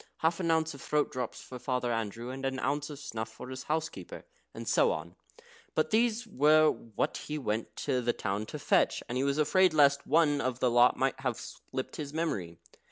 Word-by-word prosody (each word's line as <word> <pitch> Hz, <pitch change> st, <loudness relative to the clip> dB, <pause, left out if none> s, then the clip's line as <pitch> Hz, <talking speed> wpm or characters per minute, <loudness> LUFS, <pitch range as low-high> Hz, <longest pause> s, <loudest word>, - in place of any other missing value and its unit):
"Half 165 Hz, +2 st, +1 dB
an 170 Hz, -3 st, -1 dB
ounce 160 Hz, -1 st, +2 dB
of 140 Hz, -, -11 dB
throat 150 Hz, -1 st, 0 dB
drops 125 Hz, -2 st, -4 dB
for 125 Hz, -, -9 dB
Father 125 Hz, -1 st, -1 dB
Andrew, 115 Hz, +2 st, -3 dB
and 135 Hz, +1 st, -7 dB
an 135 Hz, 0 st, -1 dB
ounce 145 Hz, +2 st, -1 dB
of 145 Hz, -, -7 dB
snuff 110 Hz, -6 st, -5 dB
for 110 Hz, +3 st, -10 dB
his 130 Hz, 0 st, -7 dB
housekeeper," 160 Hz, +1 st, -4 dB, 0.3 s
and -, -, -8 dB
so 480 Hz, -, +4 dB
on. -, -, -5 dB, 0.6 s
For -, -, +4 dB
these 230 Hz, +1 st, +1 dB
were 155 Hz, -, +5 dB
what 110 Hz, -3 st, -3 dB
he 150 Hz, -, -5 dB
went 110 Hz, -5 st, -3 dB
to 130 Hz, -1 st, +1 dB
the 120 Hz, 0 st, +1 dB
town 105 Hz, -1 st, -3 dB
to -, -, -6 dB
fetch, -, -, +2 dB
and 120 Hz, -, -4 dB
he 130 Hz, -, +1 dB
was 140 Hz, +1 st, +1 dB
afraid 160 Hz, +3 st, +4 dB
lest 140 Hz, -2 st, +4 dB
one 150 Hz, -1 st, +3 dB
of 130 Hz, -1 st, -2 dB
the 125 Hz, -2 st, +2 dB
lot 120 Hz, +1 st, +5 dB
might 135 Hz, 0 st, 0 dB
have 125 Hz, -3 st, -1 dB
slipped 130 Hz, -, -7 dB
his 150 Hz, -1 st, -6 dB
memory. 95 Hz, -, -2 dB
135 Hz, 210 wpm, -30 LUFS, 120-155 Hz, 0.6 s, were